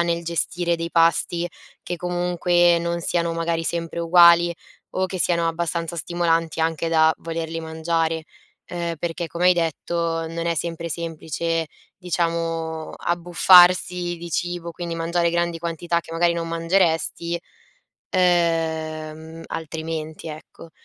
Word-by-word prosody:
nel 170 Hz, 0 st, 0 dB
gestire 170 Hz, +1 st, 0 dB
dei 165 Hz, 0 st, -4 dB
pasti 170 Hz, +1 st, +2 dB, 0.4 s
che, 175 Hz, -, -4 dB
comunque, 175 Hz, 0 st, +2 dB
non 170 Hz, 0 st, -2 dB
siano, 170 Hz, 0 st, 0 dB
magari, 165 Hz, 0 st, -1 dB
sempre 170 Hz, 0 st, -3 dB
uguali 170 Hz, 0 st, +6 dB, 0.4 s
o 185 Hz, -, -1 dB
che 185 Hz, 0 st, -4 dB
siano 170 Hz, -1 st, +2 dB
abbastanza 170 Hz, 0 st, -2 dB
stimolanti 165 Hz, -1 st, 0 dB
anche 165 Hz, 0 st, 0 dB
da 160 Hz, -1 st, +4 dB
volerli 165 Hz, 0 st, -4 dB
mangiare, 160 Hz, 0 st, -1 dB, 0.5 s
uhm, 170 Hz, -1 st, -3 dB
perché, 170 Hz, +1 st, -3 dB
come 170 Hz, +2 st, -1 dB
hai -, -, +7 dB
detto, 165 Hz, 0 st, -1 dB
non 165 Hz, +1 st, -4 dB
è 170 Hz, -, +1 dB
sempre 170 Hz, +1 st, -3 dB
semplice, 165 Hz, 0 st, -3 dB, 0.3 s
diciamo, 165 Hz, -2 st, -2 dB
abbuffarsi 175 Hz, 0 st, +4 dB
di 170 Hz, 0 st, -8 dB
cibo, 175 Hz, +1 st, -2 dB
quindi 170 Hz, 0 st, -5 dB
mangiare 170 Hz, +1 st, 0 dB
grandi 170 Hz, 0 st, 0 dB
quantità 170 Hz, 0 st, -1 dB
che, 165 Hz, -, -12 dB
magari, 170 Hz, +1 st, +2 dB
non 170 Hz, -1 st, -3 dB
mangeresti, 165 Hz, 0 st, 0 dB, 0.8 s
uhm, 160 Hz, -2 st, 0 dB
altrimenti, 160 Hz, 0 st, -5 dB
ecco. 155 Hz, +1 st, -11 dB
170 Hz, 125 wpm, -23 LUFS, 165-175 Hz, 0.8 s, hai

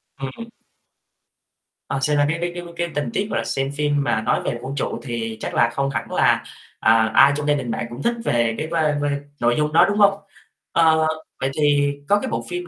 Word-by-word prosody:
Ừm. 135 Hz, -, -7 dB, 1.4 s
Ờ, 135 Hz, -, -2 dB
xem 150 Hz, +1 st, +1 dB
ra 145 Hz, -, +4 dB
cái 165 Hz, -, 0 dB
cái 175 Hz, 0 st, -1 dB
cái 175 Hz, -, -5 dB
cái 170 Hz, 0 st, -1 dB
tình 150 Hz, -, -1 dB
tiết, 205 Hz, 0 st, -1 dB
gọi 200 Hz, -, -1 dB
là, -, -, -2 dB
xem 135 Hz, +1 st, -2 dB
phim 145 Hz, -1 st, 0 dB
mà 110 Hz, -, 0 dB
nói 110 Hz, -, 0 dB
về 120 Hz, -, -2 dB
vũ 135 Hz, +1 st, -5 dB
trụ 140 Hz, -, -3 dB
thì 115 Hz, -3 st, -4 dB
chắc -, -, -5 dB
là 120 Hz, 0 st, +3 dB
không 140 Hz, +1 st, 0 dB
hẳn -, -, -4 dB
là, -, -, +3 dB, 0.4 s
à, 110 Hz, 0 st, +4 dB
ai 140 Hz, -, +7 dB
trong 150 Hz, 0 st, -3 dB
gia 145 Hz, -, +4 dB
đình 130 Hz, -5 st, -2 dB
bạn 115 Hz, -, -3 dB
cũng 120 Hz, +3 st, -8 dB
thích 235 Hz, 0 st, +1 dB
về 115 Hz, -1 st, +1 dB
cái 155 Hz, -, -3 dB
vibe 160 Hz, -3 st, +1 dB
vibe 145 Hz, -1 st, 0 dB, 0.2 s
nội 120 Hz, 0 st, +2 dB
dung 150 Hz, 0 st, 0 dB
đó, -, -, +7 dB
đúng 205 Hz, +1 st, -1 dB
hông? 200 Hz, -1 st, +6 dB, 0.6 s
Ờ, 160 Hz, -1 st, +4 dB, 0.3 s
vậy 135 Hz, -, 0 dB
thì 145 Hz, -1 st, +3 dB, 0.2 s
có 205 Hz, 0 st, +4 dB
cái -, -, -4 dB
bộ 115 Hz, 0 st, -2 dB
phim 175 Hz, 0 st, -4 dB
145 Hz, 230 wpm, -21 LUFS, 120-160 Hz, 1.4 s, ai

